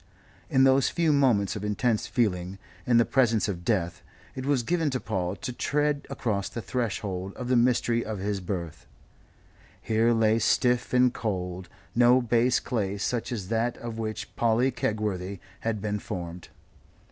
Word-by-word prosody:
In 130 - +4
those 135 0 +4
few 165 -3 +2
moments 120 -9 +2
of 105 - -5
intense 110 +2 0
feeling, 95 -6 -1 0.3
in 120 -1 +4
the 115 - +5
presence 115 -5 +2
of 90 -4 -4
death, 90 -4 -1 0.3
it 130 0 -5
was 140 -4 +2
given 165 +3 +1
to 130 -2 -2
Paul 95 -5 -2
to 125 - -5
tread 145 +2 0
across 100 -5 -2
the - - -6
threshold 100 -6 -3
of 125 -1 -5
the 130 - +3
mystery 120 -1 +2
of 110 -1 -4
his 100 +1 -2
birth. 85 -4 -5 0.9
Here 115 +1 +2
lay 115 -1 +3
stiff 125 +2 +2
and 125 0 +4
cold 90 -4 -4 0.2
no 120 +1 +5
base 120 +1 +2
clay 100 -4 -2
such 115 +4 -2
as 100 -6 -4
that 115 +1 0
of 115 -1 -6
which 110 -1 -5
Polly 120 +3 +2
Kegworthy 105 -5 -2 0.2
had 110 -2 -2
been 105 -1 -1
formed. 90 -4 -6
115 Hz, 160 wpm, -27 LUFS, 100-125 Hz, 0.9 s, the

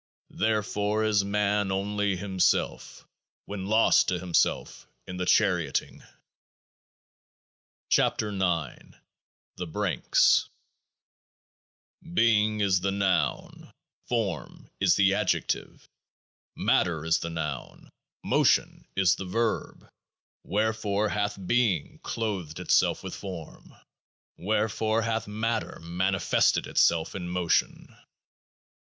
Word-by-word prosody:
Therefore 105 0 0
is 105 -2 +2
man 100 0 0
only 100 +1 -1
himself 95 0 -1 0.4
when 100 -2 -6
lost 110 +2 +4
to 90 - 0
himself 90 -1 -1 0.2
in 90 - -7
The 90 0 -3
Charioting. 90 -10 +1 1.9
16 105 -2 +1
KEOAAH 90 -4 -1
0 - - -20 0.7
THE 90 - -5
BRANKS 95 +3 +2 1.7
Being 110 -6 +3
is 95 -2 +2
the 100 - 0
Noun; 100 -2 -1 0.4
Form 105 -10 -3
is - - +4
the 100 -1 +4
Adjective. - - -2 0.7
Matter 80 -3 +1
is 80 - +2
the 85 - -4
Noun; 75 -5 -6 0.3
Motion - - +1
is 95 -1 +4
the 95 - -5
Verb. 115 +5 -2 0.6
Wherefore 105 0 0
hath 105 0 -2
Being 110 -8 0
clothed 95 -9 -4
itself - - +2
with - - -6
Form? 90 -5 -9 0.6
Wherefore 110 +2 0
hath 115 -1 -2
Matter 110 +2 -3
manifested 95 +3 +1
itself 80 -1 +2
in 90 -3 -5
Motion? 90 -1 -1
100 Hz, 100 wpm, -27 LUFS, 90-105 Hz, 1.9 s, lost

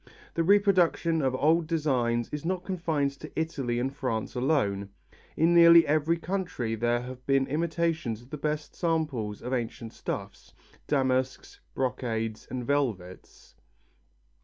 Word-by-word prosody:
The 165 - 0
reproduction 180 -4 +3
of 130 -2 +1
old 160 +4 +2
designs 125 -8 0
is 150 -1 -4
not 180 +1 -2
confined 165 -7 -1
to 155 - -9
Italy 135 -7 -2
and 135 +2 -2
France 115 -4 -3
alone. 105 -7 0 0.5
In 165 +2 +4
nearly 170 -1 +8
every 155 +3 +2
country 170 - -3
there 120 +2 0
have 125 0 -9
been 135 -1 +3
imitators 160 -6 -1
of 125 - -20
the 150 - -4
best 150 +1 -3
samples 150 - -2
of 125 +2 -3
ancient 115 -2 -4
stuffs, - - -6 0.3
damasks, 135 - 0 0.2
brocades 115 -4 -2
and 125 -2 -4
velvets. 115 -11 -3
140 Hz, 135 wpm, -28 LUFS, 120-165 Hz, 0.5 s, nearly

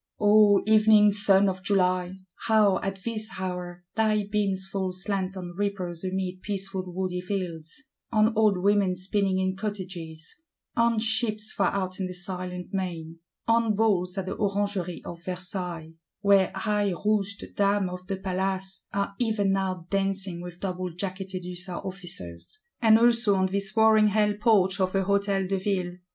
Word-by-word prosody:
— - - -44
O 205 -1 +5
evening 215 -1 +6
sun 200 -1 +4
of 185 -1 -2
July, 185 -2 +1 0.3
how, 210 -4 +4
at 195 -1 -5
this 220 -2 -1
hour, 180 -1 -5
thy 215 -1 +2
beams 200 -2 -1
fall 190 -1 -2
slant 190 0 -3
on 175 -1 -6
reapers 185 -4 -3
amid 185 -1 -3
peaceful 195 -2 -3
woody 180 0 -2
fields; 180 - -5 0.3
on 220 0 +3
old 215 -3 +4
women 200 0 +2
spinning 190 +1 0
in 190 0 0
cottages; 185 - -7 0.3
on 235 -1 +3
ships 220 -1 0
far 195 - +2
out 185 -1 -3
in 190 - -1
the 180 - -7
silent 180 0 -6
main; 170 -4 -4 0.3
on 230 -2 +3
Balls 195 -4 +1
at 190 - -2
the 190 - -4
Orangerie 200 -4 -2
of 170 0 -8
Versailles, 180 -3 -5 0.3
where 200 -2 +4
high 205 0 0
rouged 200 -1 -1
Dames 200 -1 +2
of 180 0 -8
the 195 - -2
Palace 190 0 -3
are 200 0 -2
even 215 -5 +1
now 190 -3 -1
dancing 195 -2 -1
with 175 0 -9
double 185 -1 -3
jacketted 185 +1 -5
Hussar 180 0 -5
Officers;—and 195 - -1
also 230 -3 +4
on 190 0 +1
this 195 0 -2
roaring 220 -1 +6
Hell 210 0 +2
porch 205 -3 +2
of 185 0 0
a 195 - +2
Hôtel 200 -1 +1
de 195 0 -1
Ville! 185 -2 -2
195 Hz, 155 wpm, -26 LUFS, 185-205 Hz, 0.3 s, evening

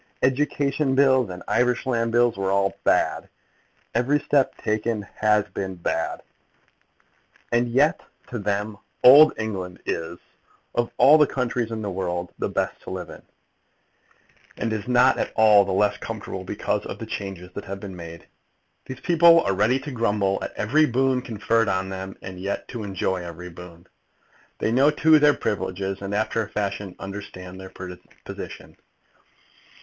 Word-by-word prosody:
Education 140 +1 +1
bills 130 -4 +4
and 90 0 -8
Irish 125 +1 +1
land 115 -3 0
bills 120 0 +3
were 95 0 -2
all 100 0 +1
bad. - - +1 0.6
Every 125 +5 +2
step 140 -1 +1
taken 110 0 -1
has 105 -1 +3
been 95 -1 -4
bad. 85 -1 -3 1.3
And 120 0 +2
yet 140 +6 +2 0.3
to 120 - -4
them 105 +1 -2 0.2
old 145 +5 +9
England 95 -5 -4
is 80 -1 -3 0.6
of 120 0 0
all 150 +2 +7
countries 125 -3 -2
in 110 -1 -4
the 100 - -3
world 90 -1 -3
the - - -1
best - - -2
to - - -10
live - - -6
in, - - -12 1.4
and 115 - -2
is 105 0 -4
not 125 +1 +4
at - - -2
all 105 -2 +6
the 95 - -3
less 105 +2 +1
comfortable - - -6
because - - -2
of - - -6
the - - -7
changes 95 -2 -6
that 100 - -7
have 100 0 -6
been 95 -2 -8
made. 85 -1 -10 0.6
These 130 -1 -8
people 170 -1 +6
are 100 - 0
ready 105 +7 +2
to 145 +1 -7
grumble 105 -5 0
at - - -4
every 150 +9 +2
boon 130 +1 +1
conferred 115 -1 0
on 95 0 -1
them, 95 0 -6
and 95 -1 -8
yet 100 +2 -4
to 120 - -6
enjoy 95 -2 -2
every 85 +1 -8
boon. 85 0 -12 0.7
They - - -1
know, 135 +5 +4
too, 155 +1 +5
their 150 0 +5
privileges, 95 -1 -3
and, 100 +1 -3
after 110 +2 0
a 105 - -10
fashion, 100 -2 -3
understand 95 -2 -8
their 95 0 -9 0.6
position. - - -9
105 Hz, 160 wpm, -24 LUFS, 95-125 Hz, 1.4 s, old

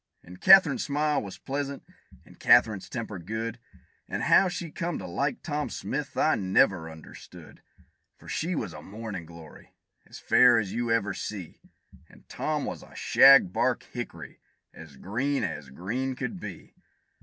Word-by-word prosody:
And 90 +1 -14
Katherine's 185 -7 +7
smile 150 0 0
was 100 -2 -8
pleasant, 140 0 -5 0.4
and - - -19
Katherine's 100 -4 +4
temper 110 -5 -5
good, 110 +6 -5 0.5
And - - -3
how 195 - +5
she 175 -3 -5
come 170 0 -3
to 95 - -7
like 140 +11 -2
Tom 150 -2 -3
Smith, 145 +1 -5
I 155 - +3
never 95 -3 +2
understood; 80 -1 -13 0.6
For - - -17
she 170 +3 -2
was 105 - -4
a - - -9
mornin' 100 -5 -7
glory, 85 -1 -14 0.3
as - - -11
fair 125 -2 +5
as 105 -4 -2
you 120 0 -2
ever 105 -3 +1
see, 95 -6 -7 0.5
And - - -20
Tom - - -3
was - - -6
a - - -16
shag 135 -9 +6
bark - - 0
hickory, - - -7 0.3
as 80 -4 -13
green 130 - -2
as 75 -4 -5
green 115 - -4
could 190 - -5
be. 100 - -9
115 Hz, 155 wpm, -27 LUFS, 90-140 Hz, 0.6 s, Katherine's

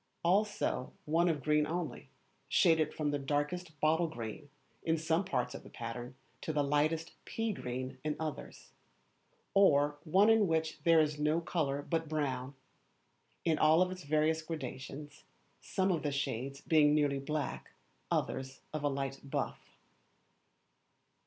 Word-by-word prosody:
Also 195 -7 +1
one 165 +3 +3
of 150 -4 -1
green 150 0 +3
only, 165 -5 -4 0.4
shaded 160 -3 +4
from 150 -2 -1
the 145 - -1
darkest 150 +4 -2
bottle 160 +3 +3
green, 120 0 -7 0.3
in 160 0 +1
some 160 +3 +1
parts 125 -10 -1
of - - -7
the - - -13
pattern, 120 +2 -6 0.3
to - - -2
the 150 -2 +1
lightest 150 +3 +1
pea 225 -1 -2
green 130 -5 -5
in 150 -1 -1
others. 155 -2 -6 0.8
Or 145 -7 +4
one 190 +6 +4
in 220 -3 +4
which 160 -2 -1
there 165 -1 +6
is 150 -1 +1
no 150 +2 +2
colour 145 -5 -1
but 165 0 -1
brown, 135 -3 -2 0.9
in 160 -2 +2
all 160 +4 +5
its 185 0 -6
various 155 +1 +1
gradations, 145 -2 -7 0.4
some 190 0 0
of 165 -4 0
the 145 - -1
shades 135 -1 -3
being 150 -2 +4
nearly 145 -2 +2
black, 150 +1 -3 0.4
others 130 0 -2
of 155 -1 -3
a 145 - +3
light 135 -1 -3
buff. 140 - -4
150 Hz, 145 wpm, -33 LUFS, 140-165 Hz, 0.9 s, there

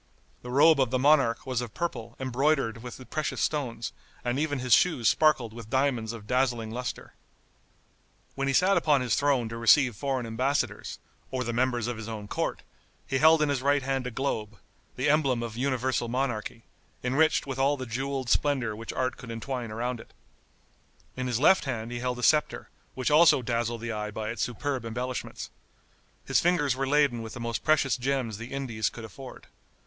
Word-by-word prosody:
The 125 - -9
robe 145 +4 +5
of 130 -3 +3
the 130 - +1
monarch 135 -4 +3
was 130 -2 -1
of 120 -3 -7
purple, 135 -10 -4
embroidered 130 -3 0
with 125 +1 -9
precious 155 -1 -2
stones, 120 -7 -2 0.3
and 120 +3 0
even 145 -1 0
his 125 -2 +1
shoes 130 -9 +4
sparkled 135 -8 +3
with 115 -2 -10
diamonds 130 -4 0
of 115 -3 -9
dazzling 120 -2 0
luster. 125 +2 -5 1.2
When 135 0 -2
he 135 - +1
sat 185 +4 +4
upon 150 -5 +3
his 125 -2 0
throne 140 -5 +2
to 115 - -6
receive 120 +1 +5
foreign 135 0 -2
embassadors, 130 +5 -1 0.3
or 130 -1 -2
the 120 0 -3
members 120 -1 +1
of 120 -1 -3
his 110 0 -7
own 105 -2 -6
court, - - -3 0.4
he 130 - -1
held 160 +1 +6
in 150 - +1
his 140 -3 0
right 140 0 +2
hand 135 -1 -1
a - - -2
globe, 110 -4 -3 0.4
the 130 +3 -1
emblem 140 -5 +2
of 115 -2 -6
universal 130 -1 0
monarchy, 120 -3 -3 0.4
enriched 140 +6 +2
with 135 -1 -5
all 140 +2 +2
the 130 - -5
jeweled 130 +2 -3
splendor 125 -4 +1
which 115 +1 -6
art 130 -1 -1
could 125 -2 -10
entwine 120 +1 -4
around 120 +2 -3
it. - - -15 1.0
In 130 0 -3
his 120 -2 0
left 175 +4 +5
hand 120 -3 -4
he 120 - -4
held 125 0 -2
a 125 - -6
scepter, 150 +3 +2 0.2
which 130 +3 -1
also 150 -4 +6
dazzled 115 -1 -1
the 120 0 -3
eye 105 -1 -3
by 110 +1 -4
its 115 - -5
superb 130 +1 -2
embellishments. 125 +3 -5 0.7
His - - +3
fingers 155 -7 +2
were 135 +1 -2
laden 140 -4 +2
with 110 -1 -8
the - - -7
most 115 -1 -3
precious 150 -4 +3
gems 125 -4 -2
the 115 +2 -8
Indies 125 -6 -2
could 115 - -9
afford. 130 +4 -11
125 Hz, 190 wpm, -28 LUFS, 115-140 Hz, 1.2 s, held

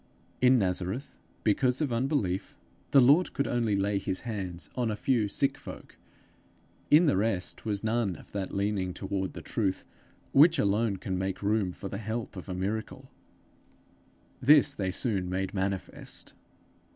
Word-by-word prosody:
In 130 +1 +6
Nazareth, 95 +5 -2 0.2
because 125 +4 +2
of 145 -6 0
unbelief, 115 - -1 0.3
the 140 - +6
Lord 145 +8 +5
could 140 - 0
only 115 -4 +1
lay 100 0 +1
his 95 -1 -3
hands 95 -7 -5
on 120 -3 -1
a 105 - -1
few 115 -1 +1
sick 135 +7 0
folk; - - -10 0.9
in 155 +4 +7
the 145 - +3
rest 95 -2 -1
was 105 -2 -2
none 110 -4 0
of - - -15
that 100 -2 -3
leaning 100 -2 -1
toward 95 -1 -3
the - - -8
truth, 100 -5 -1 0.5
which 160 +4 +6
alone 105 -2 +1
can 95 -1 -3
make 95 +1 -3
room 105 -2 +1
for 100 - -7
the 100 - -5
help 110 0 -4
of 95 +1 -8
a 90 - -3
miracle. 100 +4 -4 1.3
This 145 +1 +6
they 95 -7 -2
soon 95 -2 -1
made 95 +1 -2
manifest. 95 -1 -4
105 Hz, 155 wpm, -29 LUFS, 95-120 Hz, 1.3 s, in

